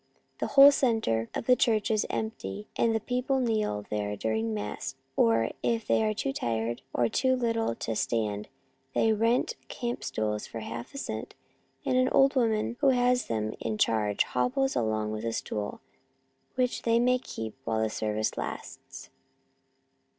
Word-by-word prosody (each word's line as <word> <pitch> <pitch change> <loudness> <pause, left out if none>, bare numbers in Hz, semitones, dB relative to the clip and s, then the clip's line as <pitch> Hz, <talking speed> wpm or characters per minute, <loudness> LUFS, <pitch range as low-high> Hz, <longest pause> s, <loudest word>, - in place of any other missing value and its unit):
The - - -1
whole 280 +1 +9
centre 220 - +1
of - - -3
the 250 - +6
church 225 -2 +2
is 215 -1 +1
empty, 105 - -4
and 230 - +2 0.2
peo 250 0 0
ple 270 +1 +1
kneel 215 - 0
there 105 -1 -1
during 110 +2 -1
the 110 - -2
mass, 105 +5 -5 0.2
or 115 0 +3
if 230 -2 0
they - - +2
are 215 0 0
too 135 - -2
tired 115 -1 -2
or 120 - +2
too 260 - +2
little 230 - 0
to 115 - -3
stand, 105 -2 -1 0.5
they 225 - +4
rent 230 +3 +1
camp 240 -1 -4
stools 105 -1 -2
for 115 - -6
half 120 - -7
a - - -5
cent, - - -5 0.5
and 255 - +2
an 255 0 +3
old 275 +1 +4
woman 230 -1 +1
who 280 - +4
has 250 -1 +2
them 110 -1 -1
in 110 -1 -2
charge 105 -2 +2
hobbles 125 - 0
along 110 -1 0
with 110 0 -4
a 115 0 -1
stool, 105 -2 -4 0.7
which 250 -1 0
they 230 0 +2
may 250 +1 +3
keep 110 - -6
while 110 -3 0
the - - +2
service 110 0 -1
lasts. - - -7
125 Hz, 170 wpm, -28 LUFS, -, 0.7 s, whole